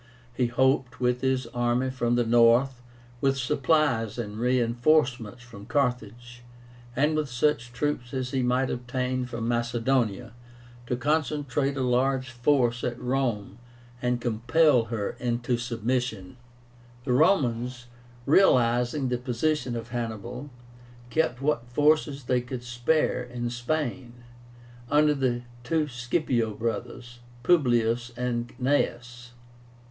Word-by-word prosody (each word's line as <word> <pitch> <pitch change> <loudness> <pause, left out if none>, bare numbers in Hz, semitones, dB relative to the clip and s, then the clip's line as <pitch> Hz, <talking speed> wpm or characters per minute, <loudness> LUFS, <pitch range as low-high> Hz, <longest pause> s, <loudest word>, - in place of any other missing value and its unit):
He 125 0 +1
hoped, 130 0 +1
with 125 0 +1
this 130 -1 0
army 120 +2 0
from 120 -2 0
the 120 -1 +2
north, 120 +2 +4 0.4
with 135 -1 +2
supplies 130 -4 +1
and 105 -3 -5
reinforcements 120 -1 +1
from 105 -4 -12
Carthage, 120 -3 -2 0.5
and 150 +4 +2
with 155 -2 -1
such 125 0 0
troops 125 -2 -2
as 130 -1 -3
he 135 - 0
might 125 +1 +1
obtain 125 +1 -2
from 115 -2 -4
Macedonia, 120 -1 0 0.5
to 125 - 0
concentrate 145 -1 0
a 130 - 0
large 130 +1 +1
force 120 -1 +1
at 120 0 -2
Rome 125 -5 -2 0.4
and 125 0 0
compel 120 +3 +3
her 110 -3 -3
into 120 0 -1
submission. 120 -2 -3 0.7
The 125 - +1
Romans, 125 -6 +2 0.4
realizing 125 -4 +3
the 125 -1 -1
position 130 +1 -1
of 115 0 -6
Hannibal, 120 +3 -5 0.6
kept 135 -3 0
what 140 -5 0
forces 145 +1 +2
they 125 0 +1
could 125 0 -7
spare 125 +3 0
in 120 -1 -5
Spain, 120 -1 -3 0.8
under 150 +1 +4
the 125 -3 -1 0.2
two 155 +4 0
Scipio 120 -3 -1
brothers, 120 +2 -5 0.2
Publius 120 -7 +2
and 120 -1 -2
Gnaeus. 120 -2 -1
125 Hz, 120 wpm, -26 LUFS, 120-135 Hz, 0.8 s, north